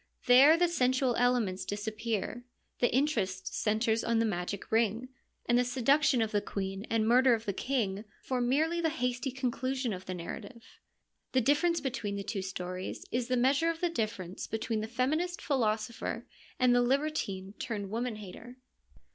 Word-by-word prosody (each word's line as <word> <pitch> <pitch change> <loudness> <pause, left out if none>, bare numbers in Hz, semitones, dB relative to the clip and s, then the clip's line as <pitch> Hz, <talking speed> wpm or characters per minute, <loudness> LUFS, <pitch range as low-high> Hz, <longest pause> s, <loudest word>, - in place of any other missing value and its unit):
There 270 +6 +8
the 350 +1 +4
sensual 255 -5 +1
elements 240 -7 +1
disappear, 220 +2 -3 0.4
the 245 - +3
interest 235 -9 0
centres 220 +1 +1
in 230 0 +1
the 230 - +3
magic 195 -1 -3
ring, 225 +2 +1 0.4
and 240 0 +3
the - - +4
seduction 260 +1 +3
of 220 - -3
the 205 -2 +1
queen 195 +1 -4
and 220 -1 +1
murder 250 +1 +5
of 225 0 -7
the 200 - -1
king 215 -4 -1 0.2
form 250 -2 -1
merely 320 +5 +2
the 325 - +2
hasty 250 -3 -2
conclusion 255 -1 -2
of 185 0 -8
the 185 - -3
narra 170 +6 -6
tive. 230 +3 -13 0.7
The 260 - +4
difference 320 +6 +2
between 245 -7 -3
the 200 - -4
two 200 -1 -3
stories 185 -1 -5
is 245 0 -1
the 255 -1 +1
measure 275 +6 +3
of 330 -1 -2
the 350 - +1
difference 210 - -3
between 220 0 -2
the 215 - -4
feminist 305 +9 -1
philosopher 230 -3 -1 0.3
and 250 -1 +5
the 245 - +4
libertine 245 -8 -1
turned 205 -5 -4
woman 235 +1 -2
hater. 215 +5 -10
240 Hz, 170 wpm, -31 LUFS, 210-260 Hz, 0.7 s, There